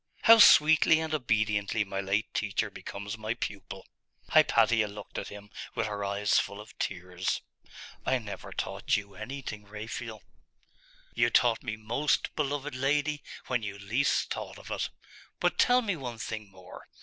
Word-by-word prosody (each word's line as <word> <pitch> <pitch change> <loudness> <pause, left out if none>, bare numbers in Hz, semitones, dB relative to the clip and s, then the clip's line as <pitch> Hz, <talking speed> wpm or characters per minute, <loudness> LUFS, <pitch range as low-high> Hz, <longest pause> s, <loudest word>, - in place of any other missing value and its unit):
'How 230 0 +9
sweetly 160 -3 +7
and 160 -1 -3
obediently 110 -5 +1
my 95 -1 -3
late 100 +3 -1
teacher 100 -2 -1
becomes 100 +2 -7
my 110 +2 -2
pupil!' 95 -4 -6 0.4
Hypatia 115 -2 +4
looked 105 0 -7
at - - -6
him 105 0 -11 0.2
with - - 0
her 105 -1 -3
eyes 100 +1 +2
full 100 - -4
of 105 - -12
tears. 90 +1 -2 0.6
'I 130 - +2
never 110 -4 -8
taught - - -1
you 100 -1 -7
anything, 110 -2 -6
Raphael.' 110 +1 -7 0.9
'You 120 0 +3
taught 120 -2 +3
me 110 - -4
most, 120 +7 0
beloved 145 -1 -2
lady, 145 +3 0 0.2
when 125 -2 0
you 100 -2 -5
least 110 +8 0
thought - - -7
of - - -11
it. - - -1 0.5
But - - +1
tell 250 0 +5
me 200 -4 -1
one 125 -6 -6
thing 110 -2 -5
more. 95 -1 -13
110 Hz, 155 wpm, -29 LUFS, 100-135 Hz, 0.9 s, How